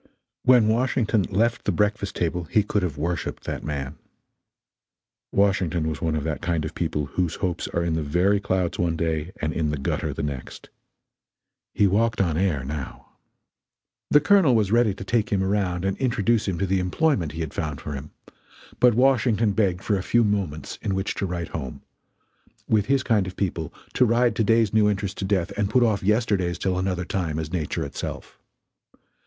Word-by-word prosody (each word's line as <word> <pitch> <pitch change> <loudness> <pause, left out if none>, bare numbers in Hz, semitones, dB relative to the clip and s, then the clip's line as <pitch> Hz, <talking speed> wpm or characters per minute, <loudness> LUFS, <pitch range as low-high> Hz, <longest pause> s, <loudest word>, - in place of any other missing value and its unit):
When 125 -4 +5
Washington 115 -1 +2
left 115 +4 0
the - - +2
breakfast 105 -1 0
table 85 0 -1
he 105 +6 +2
could 105 0 0
have 85 -5 -3
worshiped 85 +2 -3
that - - -5
man. 70 -1 -4 1.3
Washington 95 -5 +1
was 80 +1 -4
one 80 -3 0
of 75 - -2
that 80 -1 -3
kind 85 -2 -1
of 80 - -5
people 75 -3 -2
whose 85 +3 -2
hopes 90 -3 -2
are 85 - -1
in 85 -1 0
the 80 - 0
very 90 +7 +2
clouds 95 -3 -1
one 85 -1 +1
day 80 0 -2
and 75 0 0
in 80 -2 0
the 75 - -2
gutter 70 - -2
the - - -4
next. 70 -3 -6 1.1
He 105 - +4
walked 110 +4 +2
on 85 -5 +1
air 85 -6 0
now. 70 -1 -6 1.0
The 145 - +6
Colonel 160 -4 +4
was 105 -3 +2
ready 115 -4 +3
to 100 - -7
take 110 +2 0
him 95 -2 +2
around 95 -2 0
and 95 - 0
introduce 115 -3 +1
him 95 -3 -1
to 100 - 0
the 95 0 +1
employment 90 - 0
he 80 - -5
had 80 -3 -4
found 75 -3 -3
for 75 - -6
him, 70 +2 -7 0.7
but 125 -3 +5
Washington 120 -4 +3
begged 95 -3 0
for 100 -3 +1
a - - -3
few 120 +5 +2
moments 100 -8 -2
in 95 - -1
which 95 +1 -1
to 95 - -2
write 85 -2 -4
home; 65 -6 -6 0.8
with 105 -2 +2
his 135 -1 +2
kind 105 -7 +2
of 90 - -7
people, 85 -6 -2 0.2
to 125 - +4
ride 120 +1 +2
to 115 - +1
day's 115 -1 +3
new 105 -1 +4
interest 100 -1 -3
to 95 - -2
death 95 -3 0
and 105 -1 0
put 125 +3 +3
off 110 -4 +1
yesterday's 100 -4 +1
till 95 -1 -1
another 90 -1 -1
time, 85 -5 -2
is 80 +1 -4
nature 80 -5 -2
itself. - - -7
95 Hz, 195 wpm, -24 LUFS, 80-105 Hz, 1.3 s, The